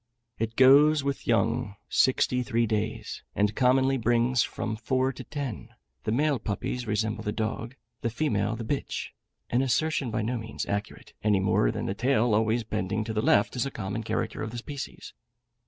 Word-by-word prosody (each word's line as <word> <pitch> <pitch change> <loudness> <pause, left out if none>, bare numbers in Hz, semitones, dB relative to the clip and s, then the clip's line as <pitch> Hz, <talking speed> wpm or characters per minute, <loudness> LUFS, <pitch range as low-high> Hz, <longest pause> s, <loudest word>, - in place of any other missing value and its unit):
It 115 0 -2
goes 145 +3 +6
with 140 -1 -3
young 115 -2 +1
sixty 125 -1 +2
three 120 -2 +1
days, 110 0 -3
and 105 +1 +1
commonly 130 +1 +3
brings 120 +1 +2
from 110 0 -2
four 130 +4 0
to - - -8
ten; 140 -7 -6 0.3
the - - 0
male 140 +2 +2
puppies 110 +3 -3
resemble 105 0 -1
the 105 - -1
dog, 115 +3 -3 0.3
the 115 - 0
female 110 -4 0
the 115 - -5
bitch 135 +5 -3 0.4
(an 120 - +3
assertion 135 +1 +1
by 110 -1 -1
no 120 +2 -1
means 110 0 -5
accurate, 100 0 -4
any 105 -2 +3
more 95 -10 +2
than - - -3
the 95 - -1
tail 120 +1 +2
always 110 +2 +2
bending 105 0 -2
to 110 - -4
the 110 - 0
left 105 +1 +3
is 125 +2 0
a - - -3
common 105 -3 -4
character 115 - -2
of 110 - -3
the 120 - -7
species). 140 +3 -7
115 Hz, 180 wpm, -27 LUFS, 110-130 Hz, 0.4 s, goes